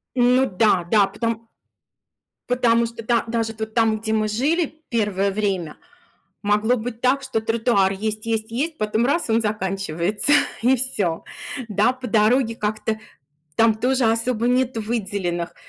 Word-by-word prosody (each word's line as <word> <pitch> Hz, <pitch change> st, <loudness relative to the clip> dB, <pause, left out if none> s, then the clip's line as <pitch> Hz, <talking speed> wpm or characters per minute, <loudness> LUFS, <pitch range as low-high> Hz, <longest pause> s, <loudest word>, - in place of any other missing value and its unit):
Ну 250 Hz, +2 st, +4 dB
да, 185 Hz, -3 st, +2 dB
да. 205 Hz, -3 st, +5 dB
Потом 230 Hz, +2 st, -4 dB, 1.0 s
Потому 235 Hz, -2 st, +3 dB
что 230 Hz, 0 st, -8 dB
да 235 Hz, 0 st, +1 dB
даже 225 Hz, -1 st, -2 dB
вот 220 Hz, 0 st, -5 dB
там, 225 Hz, -2 st, +2 dB
где 220 Hz, 0 st, -2 dB
мы 215 Hz, -1 st, +1 dB
жили 310 Hz, +8 st, -1 dB
первое 205 Hz, -4 st, 0 dB
время, 190 Hz, -6 st, -2 dB, 0.7 s
могло 210 Hz, +4 st, +2 dB
быть 230 Hz, 0 st, -6 dB
так, 260 Hz, +2 st, +2 dB
что 255 Hz, -4 st, -2 dB
тротуар 225 Hz, -3 st, +2 dB
есть, 215 Hz, +2 st, -4 dB
есть, 225 Hz, 0 st, -1 dB
есть, 300 Hz, +7 st, -2 dB
потом 215 Hz, +3 st, +1 dB
раз- 310 Hz, -1 st, 0 dB
и -, -, +1 dB
он 225 Hz, -, +3 dB
заканчивается, 195 Hz, -, -1 dB, 0.3 s
и 255 Hz, +3 st, +4 dB
всё. 200 Hz, -10 st, -1 dB, 0.4 s
Да, 210 Hz, +4 st, +2 dB
по 255 Hz, -1 st, -8 dB
дороге 230 Hz, +2 st, +2 dB
как-то 215 Hz, 0 st, -2 dB, 0.6 s
там 225 Hz, -1 st, +4 dB
тоже 255 Hz, +3 st, +1 dB
особо 230 Hz, +1 st, +1 dB
нету 250 Hz, -2 st, +1 dB
выделенных, 195 Hz, -6 st, -3 dB
225 Hz, 150 wpm, -22 LUFS, 210-245 Hz, 1.0 s, да